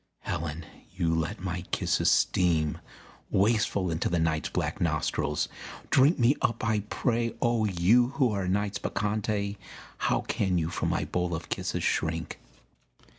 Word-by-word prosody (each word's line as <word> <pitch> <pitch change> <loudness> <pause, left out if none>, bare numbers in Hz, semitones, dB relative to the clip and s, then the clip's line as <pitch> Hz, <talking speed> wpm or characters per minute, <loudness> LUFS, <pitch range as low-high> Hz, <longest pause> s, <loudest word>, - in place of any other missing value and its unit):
Helen, 80 0 -4 0.3
you 85 -3 +1
let 80 -1 -1
my 90 -1 -3
kisses - - +1
steam 80 -4 +2 0.5
Wasteful 100 -3 +2
into 80 - -1
the 85 - +1
night's 80 -1 0
black - - -2
nostrils; 75 -1 0 0.4
drink 140 +6 +5
Me 125 +2 +4
up 115 -1 0
I 110 -1 +2
pray; 115 -2 0
oh 120 -3 +2
you 105 +6 +4
who 125 -5 +3
are 100 -3 -2
Night's 100 +1 0
Bacchante, 105 0 -1 0.4
How - - +1
can 95 -3 0
you 80 0 -1
from - - -1
my - - 0
bowl 90 -1 -1
of 80 - -7
kisses - - -2
shrink! - - -1
95 Hz, 145 wpm, -28 LUFS, 85-110 Hz, 0.5 s, drink